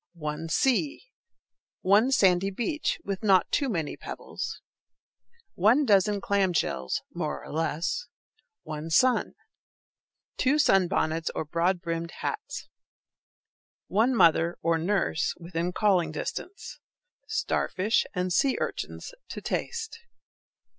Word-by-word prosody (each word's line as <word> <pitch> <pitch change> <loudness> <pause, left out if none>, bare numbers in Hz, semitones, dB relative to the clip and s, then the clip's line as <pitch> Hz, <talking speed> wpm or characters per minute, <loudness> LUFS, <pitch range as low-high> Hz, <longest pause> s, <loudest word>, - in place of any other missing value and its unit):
One 155 0 -4
sea. 280 - +1 0.7
One 205 +6 +4
sandy 195 -7 +4
beach, 245 - -1
with 195 -1 -4
not 195 -4 +3
too 280 -2 +1
many 165 -9 -2
pebbles. - - -6 0.9
One 230 +11 +4
dozen 205 -2 +3
clam 195 -2 +1
shells 65 - -1
(more - - -3
or - - -9
less). 165 - -1 0.6
One 155 +1 -6
sun. 255 +10 +3 1.0
Two 275 +3 +3
sunbonnets, 175 - +2
or - - -2
broad 170 +3 0
brimmed 165 0 -3
hats. 430 0 -4 1.2
One 230 +6 +3
mother, 170 -3 +4
or 165 -1 +2
nurse, 175 -1 0
within 170 0 -3
calling 180 -5 +2
distance. 365 - -6 0.5
Starfish 195 +4 0
and 180 0 0
sea 270 +7 +2
urchins - - -4 0.2
to - - -5
taste. 455 -1 -4
190 Hz, 110 wpm, -27 LUFS, 165-240 Hz, 1.2 s, One